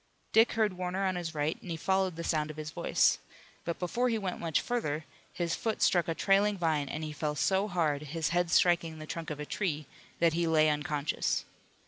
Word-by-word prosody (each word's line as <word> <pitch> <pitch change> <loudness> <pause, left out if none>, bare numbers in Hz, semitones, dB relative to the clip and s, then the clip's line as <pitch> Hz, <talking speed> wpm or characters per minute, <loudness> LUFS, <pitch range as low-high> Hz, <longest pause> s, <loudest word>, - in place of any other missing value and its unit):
Dick 225 +1 +5
heard 215 -4 +2
Warner 185 +2 -2
on 185 -1 0
his 170 -2 -4
right, 150 +2 -1
and 180 - -10
he 165 - -2
followed 190 +1 +1
the 170 - -5
sound 155 -2 0
of 155 - -8
his 155 0 -5
voice. 170 +1 +2 0.5
But 170 - -2
before 240 +8 0
he 225 - +1
went 190 -4 -3
much 165 -2 +1
further 160 -11 -2 0.3
his 170 -2 -2
foot 225 -1 -2
struck 175 -2 +3
a 165 - -1
trailing 200 +2 +3
vine, 155 -5 0
and 155 - -4
he 155 -1 -4
fell 150 0 -2
so 190 +7 +2
hard, 160 -7 0
his 155 +1 -2
head 175 0 +1
striking 170 -2 +3
the 155 - -8
trunk 165 +1 -5
of 150 -1 -5
a 150 - -4
tree, 155 -4 -2 0.3
that 165 -1 +4
he 170 0 +1
lay 155 -1 +4
unconscious. 150 0 -1
170 Hz, 215 wpm, -30 LUFS, 155-185 Hz, 0.5 s, Dick